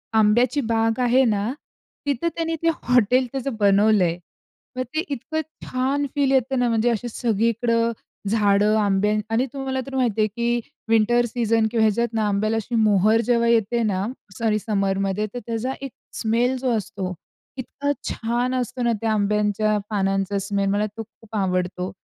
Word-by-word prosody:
आंब्याची 235 Hz, +6 st, +3 dB
बाग 225 Hz, +1 st, +1 dB
आहे 250 Hz, +2 st, +4 dB
ना, 210 Hz, 0 st, 0 dB, 0.5 s
तिथं 285 Hz, +3 st, 0 dB
त्यांनी 330 Hz, 0 st, -1 dB
ते 330 Hz, -, +4 dB
हॉटेल 250 Hz, +1 st, +3 dB
त्याचं 270 Hz, -2 st, -3 dB
बनवलंय. 200 Hz, -3 st, +3 dB, 0.6 s
मग 255 Hz, -, 0 dB
ते 315 Hz, -, +1 dB
इतकं 315 Hz, +5 st, -3 dB, 0.2 s
छान 270 Hz, +3 st, 0 dB
फील 280 Hz, -2 st, +2 dB
येतं 265 Hz, 0 st, +2 dB
ना 245 Hz, -, +2 dB
म्हणजे 230 Hz, +1 st, +2 dB
असे 235 Hz, 0 st, -1 dB
सगळीकडं 230 Hz, +1 st, +1 dB, 0.4 s
झाडं 210 Hz, 0 st, +3 dB
आंब्याची 210 Hz, +1 st, +2 dB
आणि 240 Hz, +3 st, +2 dB
तुम्हाला 270 Hz, -1 st, -3 dB
तर 270 Hz, -, -7 dB
माहिती 235 Hz, -5 st, +1 dB
आहे 215 Hz, -, +3 dB
की 235 Hz, +3 st, -1 dB, 0.3 s
विंटर 230 Hz, +2 st, +3 dB
सीझन 230 Hz, -1 st, +1 dB
किंवा 230 Hz, -2 st, +2 dB
ह्याच्यात 230 Hz, +2 st, +1 dB
ना 220 Hz, -2 st, +1 dB
आंब्याला 215 Hz, +2 st, 0 dB
अशी 230 Hz, +2 st, -3 dB
मोहर 215 Hz, 0 st, +4 dB
जेव्हा 235 Hz, -1 st, +3 dB
येते 235 Hz, 0 st, +2 dB
ना, 195 Hz, -3 st, 0 dB, 0.3 s
सॉरी 220 Hz, -2 st, +1 dB
समरमध्ये 195 Hz, -1 st, 0 dB
तर 245 Hz, -, -4 dB
त्याचा 230 Hz, +2 st, -2 dB
1 275 Hz, -, -6 dB, 0.3 s
स्मेल 235 Hz, +3 st, +1 dB
जो 255 Hz, 0 st, -1 dB
असतो 190 Hz, -2 st, -4 dB, 0.4 s
इतका 280 Hz, +3 st, -3 dB, 0.2 s
छान 240 Hz, +2 st, -1 dB
असतो 250 Hz, 0 st, -3 dB
ना 235 Hz, -, +2 dB
त्या 225 Hz, -1 st, 0 dB
आंब्यांच्या 210 Hz, 0 st, +1 dB
पानांचा 195 Hz, -1 st, 0 dB
स्मेल. 200 Hz, 0 st, -1 dB
मला 205 Hz, +1 st, +1 dB
तो 225 Hz, -, -4 dB
खूप 225 Hz, 0 st, -14 dB
आवडतो 185 Hz, -2 st, -1 dB
225 Hz, 160 wpm, -23 LUFS, 210-245 Hz, 0.6 s, आहे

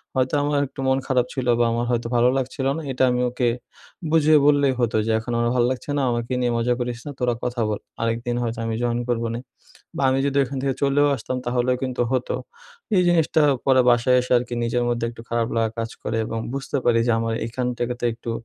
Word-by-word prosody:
হয়তো 130 Hz, +1 st, +1 dB
আমার 145 Hz, 0 st, 0 dB
একটু 135 Hz, -, -16 dB
মন 130 Hz, 0 st, +3 dB
খারাপ 125 Hz, -2 st, +2 dB
ছিল 130 Hz, -2 st, -3 dB
বা 120 Hz, -, +4 dB
আমার 120 Hz, +1 st, -1 dB
হয়তো 120 Hz, -1 st, -1 dB
ভালো 120 Hz, +1 st, +4 dB
লাগছিল 130 Hz, +1 st, -3 dB
না -, -, -4 dB
এটা 130 Hz, 0 st, 0 dB
আমি 125 Hz, 0 st, 0 dB
ওকে 125 Hz, -1 st, 0 dB, 0.6 s
বুঝিয়ে 155 Hz, -1 st, +5 dB
বললেই 140 Hz, -2 st, +4 dB
হতো 115 Hz, -2 st, +1 dB
যে, 115 Hz, -, 0 dB
"এখন 115 Hz, +2 st, -6 dB
আমার 120 Hz, 0 st, +1 dB
ভাল 120 Hz, -, +3 dB
লাগছে 130 Hz, +3 st, -6 dB
না -, -, +1 dB
আমার 120 Hz, -1 st, -1 dB, 0.2 s
নিয়ে 120 Hz, -, +1 dB
মজা 120 Hz, +1 st, +1 dB
করিস 120 Hz, -1 st, -3 dB
না। 145 Hz, -, -5 dB
তোরা 125 Hz, -1 st, +1 dB
কথা 120 Hz, -1 st, -2 dB
বল 105 Hz, -, -2 dB, 0.2 s
আরেকদিন 115 Hz, +1 st, -1 dB
হয়তো 115 Hz, 0 st, -3 dB
আমি 115 Hz, -, -2 dB
জয়েন 120 Hz, 0 st, 0 dB
করবোনে" 115 Hz, 0 st, -1 dB, 0.6 s
বা, -, -, -2 dB
আমি 135 Hz, -, +1 dB
যদি 140 Hz, 0 st, +1 dB
এখান 135 Hz, +1 st, -5 dB
থেকে 135 Hz, -2 st, 0 dB
চলেও 140 Hz, +1 st, +3 dB
আসতাম 125 Hz, +2 st, -4 dB
তাহলেও 125 Hz, +1 st, +1 dB
কিন্তু 130 Hz, -2 st, -1 dB
হত। 130 Hz, -1 st, -1 dB, 0.7 s
এই 180 Hz, -, +5 dB
জিনিসটা 160 Hz, -2 st, +3 dB, 0.2 s
পরে 130 Hz, -1 st, +5 dB
বাসায় 120 Hz, +2 st, +4 dB
এসে 125 Hz, -, -3 dB
আরকি 120 Hz, 0 st, -5 dB
নিজের 120 Hz, +1 st, 0 dB
মধ্যে 120 Hz, -1 st, -1 dB
একটু 115 Hz, -1 st, -11 dB
খারাপ 115 Hz, 0 st, 0 dB
লাগা 115 Hz, -1 st, +1 dB
কাজ 115 Hz, 0 st, -2 dB
করে 115 Hz, -, -2 dB
এবং 115 Hz, -, -4 dB
বুঝতে 140 Hz, +1 st, -3 dB
পারি 115 Hz, -1 st, +3 dB
যে 120 Hz, -, +3 dB
আমার 115 Hz, 0 st, -1 dB
এখান 125 Hz, +2 st, -3 dB
থেকে 120 Hz, 0 st, -1 dB
তো -, -, -3 dB
একটু 115 Hz, 0 st, -7 dB
120 Hz, 225 wpm, -23 LUFS, 120-130 Hz, 0.7 s, বুঝিয়ে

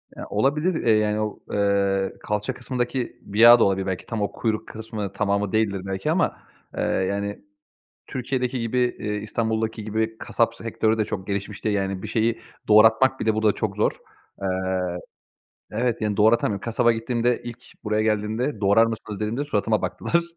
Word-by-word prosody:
Ya -, -, -7 dB
olabilir, 145 Hz, -, +1 dB
eee, 115 Hz, -, +4 dB
yani 105 Hz, 0 st, +1 dB
o 105 Hz, -1 st, -3 dB
eee, 100 Hz, -1 st, +1 dB
kalça 105 Hz, +4 st, -2 dB
kısmındaki 125 Hz, -1 st, -3 dB
bir 105 Hz, +2 st, -5 dB
yağ 120 Hz, +1 st, +9 dB
da -, -, +5 dB
olabilir 95 Hz, -1 st, +1 dB
belki, 95 Hz, -2 st, -3 dB
tam 115 Hz, -2 st, -3 dB
o 100 Hz, -, -1 dB
kuyruk 110 Hz, -2 st, -2 dB
kısmı, 110 Hz, -3 st, -6 dB
tamamı 100 Hz, 0 st, 0 dB
değildir 105 Hz, -3 st, +1 dB
belki 95 Hz, 0 st, -2 dB
ama, -, -, +1 dB, 0.4 s
eee, -, -, 0 dB
yani 100 Hz, +2 st, -1 dB, 0.7 s
Türkiye'deki 125 Hz, -1 st, -2 dB
gibi, 115 Hz, +2 st, -1 dB, 0.2 s
eee, 105 Hz, 0 st, -3 dB
İstanbul’daki 110 Hz, +1 st, -2 dB
gibi, 110 Hz, +1 st, -2 dB
kasap -, -, 0 dB
sektörü 110 Hz, 0 st, 0 dB
de 110 Hz, -, +2 dB
çok 95 Hz, -2 st, -5 dB
gelişmiş 100 Hz, 0 st, -4 dB
değil 105 Hz, -1 st, +1 dB
yani. 95 Hz, -1 st, -2 dB
Bir -, -, -5 dB
şeyi 115 Hz, +1 st, 0 dB, 0.3 s
doğratmak 110 Hz, +5 st, +5 dB
bir -, -, -2 dB
de 110 Hz, -, +3 dB
burada 110 Hz, -1 st, +3 dB
çok -, -, -3 dB
zor. -, -, +2 dB, 0.5 s
Eee 95 Hz, -1 st, -1 dB, 0.8 s
Evet, 120 Hz, +1 st, 0 dB
yani 105 Hz, -2 st, -1 dB
doğratamıyorum. 110 Hz, -2 st, +3 dB
Kasaba 120 Hz, +1 st, +2 dB
gittiğimde 120 Hz, +1 st, 0 dB
ilk 120 Hz, -1 st, -8 dB, 0.2 s
buraya 105 Hz, 0 st, +1 dB
geldiğimde 110 Hz, +3 st, -1 dB
"Doğrar 100 Hz, +3 st, +5 dB
mısınız?" 110 Hz, -2 st, -5 dB
dediğimde 115 Hz, +7 st, -2 dB
suratıma 110 Hz, -4 st, 0 dB
baktılar 170 Hz, 0 st, 0 dB
110 Hz, 170 wpm, -24 LUFS, 100-115 Hz, 0.8 s, yağ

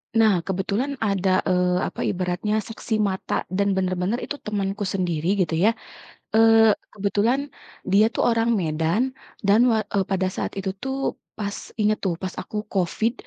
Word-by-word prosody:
Nah, 215 Hz, -5 st, +5 dB
kebetulan 200 Hz, +9 st, -1 dB
ada, 190 Hz, -2 st, +2 dB
eee, 180 Hz, -1 st, +1 dB
apa -, -, -8 dB
ibaratnya 185 Hz, +4 st, -1 dB
saksi 225 Hz, +1 st, -4 dB
mata 190 Hz, -, -2 dB
dan 200 Hz, +1 st, +1 dB
bener-bener 185 Hz, +4 st, 0 dB
itu 290 Hz, -, -5 dB
temenku 205 Hz, -1 st, -2 dB
sendiri 180 Hz, -1 st, 0 dB
gitu 165 Hz, -, -4 dB
ya. 230 Hz, +2 st, +4 dB, 0.6 s
Eee, 225 Hz, -1 st, +6 dB, 0.2 s
kebetulan 215 Hz, +7 st, 0 dB, 0.4 s
dia 210 Hz, +4 st, +4 dB
tuh -, -, -1 dB
orang 230 Hz, 0 st, +2 dB
Medan 165 Hz, +11 st, 0 dB, 0.2 s
dan 200 Hz, +1 st, +4 dB
wa 220 Hz, -, +3 dB
eee, 195 Hz, -2 st, 0 dB
pada 190 Hz, 0 st, 0 dB
saat 185 Hz, -, -3 dB
itu 190 Hz, 0 st, -3 dB
tuh, 270 Hz, 0 st, -2 dB, 0.2 s
pas 205 Hz, -1 st, -3 dB, 0.2 s
inget 215 Hz, 0 st, +3 dB
tuh, 185 Hz, -4 st, +1 dB
pas 185 Hz, -1 st, -4 dB
aku 210 Hz, -, -6 dB
COVID 210 Hz, +5 st, 0 dB
200 Hz, 155 wpm, -24 LUFS, 185-225 Hz, 0.6 s, Eee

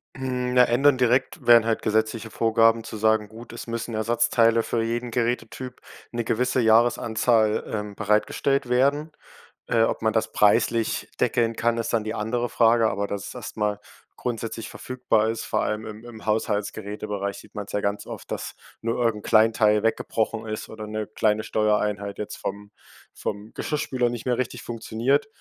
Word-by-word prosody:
Hm, 125 Hz, -1 st, -2 dB
na, 125 Hz, -, +7 dB
ändern 135 Hz, +3 st, +4 dB
direkt 125 Hz, +1 st, +1 dB
wären 115 Hz, -1 st, +7 dB
halt 115 Hz, -1 st, 0 dB
gesetzliche 110 Hz, +1 st, 0 dB
Vorgaben, 115 Hz, 0 st, +3 dB
zu 110 Hz, -, -7 dB
sagen: 110 Hz, 0 st, +2 dB
Gut, 115 Hz, +1 st, -11 dB
es 120 Hz, -, -8 dB
müssen 115 Hz, 0 st, -4 dB
Ersatzteile 115 Hz, +1 st, +3 dB
für 115 Hz, 0 st, -1 dB
jeden 120 Hz, +1 st, -2 dB
Gerätetyp 120 Hz, +1 st, -3 dB, 0.3 s
'ne 120 Hz, -1 st, -2 dB
gewisse 125 Hz, +3 st, 0 dB
Jahresanzahl, 110 Hz, -1 st, +3 dB
ähm, 105 Hz, -1 st, -4 dB
bereitgestellt 110 Hz, +5 st, +1 dB
werden. 140 Hz, +5 st, +2 dB, 0.6 s
Äh, 115 Hz, -, +3 dB
ob -, -, 0 dB
man 110 Hz, -1 st, +1 dB
das 110 Hz, -, 0 dB
preislich 105 Hz, +2 st, +2 dB
deckeln 115 Hz, -1 st, +2 dB
kann, 115 Hz, +1 st, +1 dB
ist 115 Hz, -, -2 dB
dann 115 Hz, -, +2 dB
die 110 Hz, -, -2 dB
andere 120 Hz, +3 st, -1 dB
Frage, 115 Hz, -1 st, +4 dB
aber 100 Hz, 0 st, -2 dB
dass 100 Hz, -2 st, -4 dB
es -, -, -9 dB
erst -, -, -8 dB
mal 105 Hz, -1 st, 0 dB, 0.4 s
grundsätzlich 115 Hz, -2 st, -4 dB
verfügbar 115 Hz, -4 st, 0 dB
ist. 115 Hz, 0 st, -3 dB
Vor -, -, 0 dB
allem 110 Hz, +1 st, -2 dB
im 110 Hz, +1 st, -9 dB
im 115 Hz, -2 st, -11 dB
Haushaltsgeräte-Bereich 105 Hz, -1 st, -2 dB
sieht -, -, -16 dB
man's 105 Hz, -1 st, -6 dB
ja 105 Hz, -, 0 dB
ganz 100 Hz, 0 st, -2 dB
oft, -, -, -9 dB
dass -, -, -4 dB, 0.3 s
nur 115 Hz, +1 st, -1 dB
irgend 110 Hz, -3 st, 0 dB
'n -, -, -7 dB
kleinen 110 Hz, +1 st, +5 dB
Teil 105 Hz, -1 st, +3 dB
weggebrochen 115 Hz, 0 st, -1 dB
ist 110 Hz, 0 st, -5 dB
oder 110 Hz, -1 st, -7 dB
'ne 110 Hz, 0 st, -3 dB
kleine 110 Hz, 0 st, +1 dB
Steuereinheit 105 Hz, -2 st, 0 dB
jetzt 105 Hz, -, -5 dB
vom 100 Hz, +1 st, -6 dB, 0.4 s
vom 105 Hz, +2 st, -5 dB
Geschirrspüler 130 Hz, -5 st, -1 dB
nicht 120 Hz, -1 st, -6 dB
mehr 125 Hz, -2 st, +1 dB
richtig 130 Hz, -2 st, -3 dB
funktioniert. 120 Hz, -, 0 dB
115 Hz, 170 wpm, -25 LUFS, 105-120 Hz, 0.6 s, na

